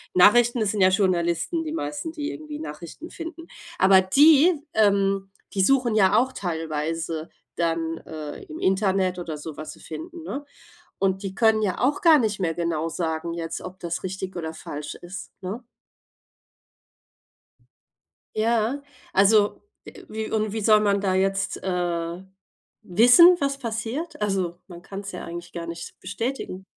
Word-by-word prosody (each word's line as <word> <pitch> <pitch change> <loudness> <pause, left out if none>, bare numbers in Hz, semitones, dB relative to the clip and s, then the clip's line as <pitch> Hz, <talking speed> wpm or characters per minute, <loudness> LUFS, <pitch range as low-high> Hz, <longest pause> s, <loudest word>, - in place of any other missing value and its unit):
Nachrichten, 240 +6 +6
das 215 -2 +1
sind 205 -3 -1
ja 185 - +7
Journalisten 185 - +1
die 310 - -5
meisten, 315 0 -4
die 300 -2 -4
irgendwie 305 -1 -7
Nachrichten 295 - -8
finden. 335 0 -8 0.3
Aber 190 0 +6
die 290 - +6 0.2
ähm, 195 -2 +2 0.2
die 195 - +1
suchen 250 +1 +3
ja 195 -1 +4
auch 260 +2 +2
teilweise 165 -2 -3 0.3
dann, 165 -1 -1
äh, 155 -2 -7
im 155 - -9
Internet 190 -1 +1
oder 160 -3 -5
so 150 0 -8
was 155 0 -7
sie - - -17
finden, 340 0 -8
ne? 290 -2 -5 0.5
Und 195 0 0
die 195 - -4
können 220 0 +4
ja 190 -3 -1
auch 275 +4 +1
gar 325 -3 +7
nicht 215 -4 0
mehr 170 -3 0
genau 165 -1 -1
sagen 165 0 -3
jetzt, 165 -1 -4
ob 185 +1 -9
das 170 -1 -4
richtig 190 0 -5
oder 160 -2 -4
falsch 150 -2 -7
ist, 190 +3 -9
ne? 200 +7 -5 2.7
Ja, 230 +5 +1 0.3
also, 205 +1 +4 0.2
äh, - - -12
wie 220 0 -4
und 215 -1 0
wie 220 -1 -3
soll 215 0 +6
man 200 -1 +2
da 190 -2 +1
jetzt, 195 +1 0
äh, 175 -1 -2 0.6
wissen, 245 - +7
was 275 -1 0
passiert? 240 +7 -4
Also, 190 -4 -1
man 175 -1 -10
kann's 200 +1 -7
ja 180 - -6
eigentlich 170 0 -8
gar 170 -1 -5
nicht 170 0 -8
bestätigen. 200 -1 -4
195 Hz, 155 wpm, -24 LUFS, 170-235 Hz, 2.7 s, ja